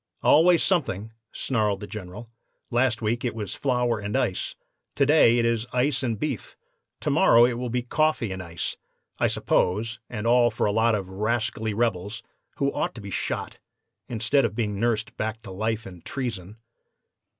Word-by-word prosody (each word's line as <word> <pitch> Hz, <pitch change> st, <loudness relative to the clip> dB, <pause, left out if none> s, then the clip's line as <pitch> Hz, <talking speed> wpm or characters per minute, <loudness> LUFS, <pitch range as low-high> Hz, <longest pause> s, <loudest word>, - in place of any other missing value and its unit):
"'Always 170 Hz, +2 st, +6 dB
something,' 110 Hz, -, 0 dB, 0.2 s
snarled 105 Hz, -6 st, 0 dB
the 105 Hz, -, -6 dB
General. 105 Hz, +2 st, -8 dB, 0.4 s
'Last 120 Hz, -2 st, +1 dB
week 115 Hz, +2 st, 0 dB
it 120 Hz, -3 st, -2 dB
was 105 Hz, -3 st, -4 dB
flour 125 Hz, -4 st, 0 dB
and 105 Hz, 0 st, -2 dB
ice; 90 Hz, -, -1 dB, 0.4 s
to 140 Hz, -, +3 dB
day 135 Hz, -5 st, +5 dB
it 120 Hz, -, +2 dB
is 115 Hz, 0 st, 0 dB
ice 130 Hz, +2 st, +2 dB
and 115 Hz, -5 st, -1 dB
beef; -, -, -4 dB, 0.4 s
to -, -, 0 dB
morrow 120 Hz, +1 st, +6 dB
it 125 Hz, -, +1 dB
will 125 Hz, -1 st, -3 dB
be 125 Hz, +1 st, -1 dB
coffee 150 Hz, -4 st, +1 dB
and 95 Hz, 0 st, -4 dB
ice, 85 Hz, -2 st, -4 dB, 0.4 s
I -, -, +3 dB
suppose, 110 Hz, +6 st, 0 dB
and 110 Hz, -2 st, -5 dB
all 120 Hz, 0 st, +5 dB
for -, -, -1 dB
a 105 Hz, -, +2 dB
lot 110 Hz, +1 st, +3 dB
of 100 Hz, -3 st, -3 dB
rascally 110 Hz, +2 st, -1 dB
rebels, 110 Hz, 0 st, -1 dB, 0.3 s
who 140 Hz, 0 st, 0 dB
ought -, -, -2 dB
to 115 Hz, -, -8 dB
be 100 Hz, 0 st, -8 dB
shot, -, -, -3 dB, 0.5 s
instead 120 Hz, +4 st, +2 dB
of 110 Hz, -3 st, -1 dB
being 105 Hz, -4 st, -1 dB
nursed 110 Hz, -1 st, 0 dB
back 110 Hz, +1 st, -3 dB
to 100 Hz, -, -9 dB
life 110 Hz, +3 st, -2 dB
and 90 Hz, -3 st, -11 dB
treason. 110 Hz, -7 st, -5 dB
115 Hz, 175 wpm, -25 LUFS, 105-120 Hz, 0.5 s, Always